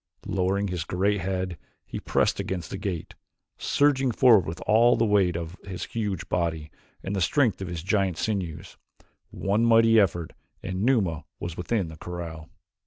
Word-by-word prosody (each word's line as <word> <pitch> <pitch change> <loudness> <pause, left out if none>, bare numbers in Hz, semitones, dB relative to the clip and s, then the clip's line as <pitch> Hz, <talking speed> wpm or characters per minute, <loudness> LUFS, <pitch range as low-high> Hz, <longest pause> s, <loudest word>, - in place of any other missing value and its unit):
Lowering 100 0 0
his 90 -3 -2
great 100 +3 0
head 95 -2 -3 0.3
he - - -6
pressed - - +1
against 90 -4 -4
the 95 - -4
gate, 95 -5 -4 0.5
surging 140 -2 +2
forward 115 -5 +5
with 80 +1 -5
all 120 +3 +4
the 115 - +2
weight 100 -5 +3
of 85 0 -5
his 95 -2 -6
huge 105 -6 -3
body 80 -3 -2 0.3
and 95 - -3
the 95 - -1
strength 115 - +2
of 95 - -4
his 85 -3 -5
giant 95 -3 +1
sinews 90 -4 -3 0.5
one 100 +4 0
mighty 115 -1 +6
effort 85 -5 0 0.3
and 95 0 -3
Numa 100 - +1
was 85 -2 -5
within 90 0 -1
the 80 - -10
corral. 85 -3 -7
95 Hz, 165 wpm, -26 LUFS, 85-105 Hz, 0.5 s, mighty